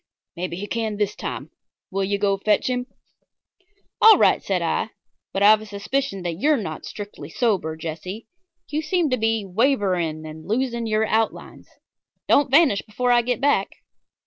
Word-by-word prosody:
"Maybe 175 Hz, 0 st, -4 dB
he 195 Hz, +3 st, -5 dB
can 220 Hz, -1 st, -3 dB
this 210 Hz, -1 st, -1 dB
time. -, -, -6 dB, 0.4 s
Will 195 Hz, +1 st, -1 dB
you 200 Hz, +1 st, 0 dB
go 200 Hz, 0 st, +1 dB
fetch 210 Hz, +5 st, +1 dB
him?" 250 Hz, 0 st, -2 dB, 1.1 s
"All 440 Hz, -1 st, +9 dB
right," -, -, +4 dB
said -, -, -1 dB
I, -, -, -1 dB, 0.4 s
"but 195 Hz, -, -1 dB
I've 215 Hz, +1 st, +7 dB
a -, -, -9 dB
suspicion 205 Hz, +1 st, -3 dB
that 170 Hz, -1 st, -4 dB
you're 300 Hz, +5 st, +3 dB
not 160 Hz, -9 st, -5 dB
strictly 205 Hz, -8 st, -8 dB
sober, 185 Hz, -7 st, 0 dB
Jesse. 165 Hz, +6 st, -6 dB, 0.4 s
You 300 Hz, +1 st, -1 dB
seem 320 Hz, -2 st, 0 dB
to 255 Hz, -, +2 dB
be 225 Hz, -2 st, 0 dB
wavering 185 Hz, -, 0 dB
and 155 Hz, 0 st, -10 dB
losing 235 Hz, +1 st, -1 dB
your 215 Hz, 0 st, +1 dB
outlines. 220 Hz, 0 st, -2 dB, 0.6 s
Don't 285 Hz, -1 st, +4 dB
vanish 275 Hz, -7 st, +4 dB
before 245 Hz, +4 st, -1 dB
I 240 Hz, 0 st, +5 dB
get 245 Hz, +1 st, -1 dB
back." 275 Hz, -9 st, +2 dB
215 Hz, 165 wpm, -23 LUFS, 190-250 Hz, 1.1 s, All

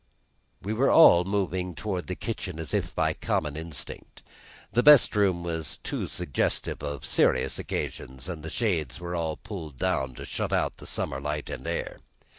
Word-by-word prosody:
We 105 Hz, -, -2 dB
were 130 Hz, +5 st, +3 dB
all 90 Hz, -, +8 dB
moving 95 Hz, -2 st, -1 dB
toward 95 Hz, +1 st, -3 dB
the 90 Hz, -, -3 dB
kitchen 95 Hz, -7 st, -5 dB
as 80 Hz, -, -5 dB
if -, -, -1 dB
by -, -, +2 dB
common 75 Hz, -1 st, -1 dB
instinct. 80 Hz, -2 st, -8 dB, 0.5 s
The 120 Hz, -, +4 dB
best 145 Hz, -4 st, +7 dB
room 95 Hz, -4 st, +2 dB
was 80 Hz, -4 st, -4 dB
too -, -, -3 dB
suggestive 80 Hz, -7 st, -2 dB
of 75 Hz, -1 st, -5 dB
serious 65 Hz, -, +2 dB
occasions, 65 Hz, +3 st, -4 dB
and 85 Hz, -4 st, -5 dB
the 80 Hz, -, -6 dB
shades 85 Hz, -, -1 dB
were 85 Hz, 0 st, -5 dB
all 80 Hz, -2 st, -1 dB
pulled 80 Hz, -, -8 dB
down 65 Hz, 0 st, 0 dB
to -, -, -7 dB
shut -, -, -3 dB
out -, -, +1 dB
the -, -, -9 dB
summer 65 Hz, 0 st, -2 dB
light 75 Hz, 0 st, -3 dB
and -, -, -6 dB
air. -, -, -3 dB
85 Hz, 175 wpm, -27 LUFS, 75-95 Hz, 0.5 s, all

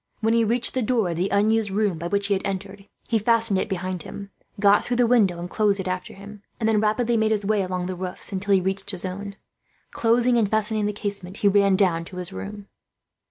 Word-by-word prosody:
When 225 Hz, +1 st, +2 dB
he 230 Hz, 0 st, +3 dB
reached 235 Hz, +2 st, +2 dB
the 260 Hz, -, 0 dB
door 225 Hz, -4 st, +1 dB
of -, -, -3 dB
the 185 Hz, +3 st, 0 dB
unused 215 Hz, +1 st, +2 dB
room 195 Hz, -4 st, 0 dB
by 170 Hz, -, -4 dB
which 200 Hz, +2 st, 0 dB
they 200 Hz, -, +1 dB
had 195 Hz, -, -1 dB
entered, 195 Hz, +1 st, -5 dB, 0.2 s
he 225 Hz, -, +1 dB
fastened 225 Hz, -2 st, +3 dB
it -, -, -3 dB
behind 185 Hz, -2 st, -3 dB
him, 200 Hz, -1 st, -9 dB, 0.3 s
got 200 Hz, 0 st, +4 dB
through 245 Hz, -, -2 dB
the 245 Hz, -, +4 dB
window 220 Hz, -7 st, +3 dB
and 175 Hz, +1 st, -5 dB
closed 205 Hz, +1 st, +1 dB
it 190 Hz, -, -4 dB
after 185 Hz, 0 st, -4 dB
him, 200 Hz, +1 st, -12 dB, 0.2 s
and 220 Hz, -, 0 dB
then 215 Hz, -2 st, +2 dB
rapidly 230 Hz, +2 st, +1 dB
made 220 Hz, 0 st, +2 dB
his 210 Hz, -2 st, 0 dB
way 210 Hz, 0 st, +1 dB
along 185 Hz, -1 st, -3 dB
the 185 Hz, 0 st, -4 dB
roofs, 180 Hz, +2 st, -5 dB
until 200 Hz, +1 st, +1 dB
he 190 Hz, -, +2 dB
reached 190 Hz, +2 st, -2 dB
his 190 Hz, -2 st, 0 dB
own. 200 Hz, +2 st, -6 dB, 0.6 s
Closing 240 Hz, +1 st, +2 dB
and 210 Hz, -3 st, +1 dB
fastening 215 Hz, 0 st, 0 dB
the -, -, 0 dB
casement, 200 Hz, -2 st, -5 dB
he 205 Hz, -, +2 dB
ran 200 Hz, -1 st, +4 dB
down 180 Hz, -4 st, +2 dB
to 180 Hz, -, -10 dB
his 180 Hz, +1 st, -6 dB
room. 205 Hz, +1 st, -8 dB
200 Hz, 240 wpm, -23 LUFS, 190-220 Hz, 0.6 s, got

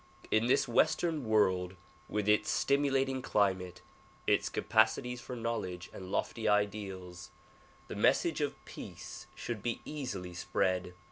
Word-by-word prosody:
In 110 Hz, +2 st, +3 dB
this 125 Hz, -, +3 dB
western 155 Hz, +4 st, +2 dB
world 95 Hz, -4 st, +2 dB, 0.3 s
with 105 Hz, -1 st, -1 dB
its 105 Hz, 0 st, +4 dB
stimulating 135 Hz, -2 st, +2 dB
climate, 95 Hz, -7 st, 0 dB, 0.4 s
its -, -, +2 dB
capacities 120 Hz, +3 st, +2 dB
for 125 Hz, -, -6 dB
knowledge 105 Hz, -7 st, -3 dB
and 95 Hz, 0 st, -8 dB
lofty 110 Hz, -2 st, -1 dB
ideals, 95 Hz, -4 st, -1 dB, 0.6 s
the -, -, -6 dB
message -, -, +3 dB
of -, -, 0 dB
peace -, -, -9 dB
should 115 Hz, -4 st, -4 dB
be 120 Hz, +2 st, -2 dB
easily 100 Hz, -12 st, -5 dB
spread. 90 Hz, 0 st, 0 dB
105 Hz, 125 wpm, -32 LUFS, 95-125 Hz, 0.6 s, its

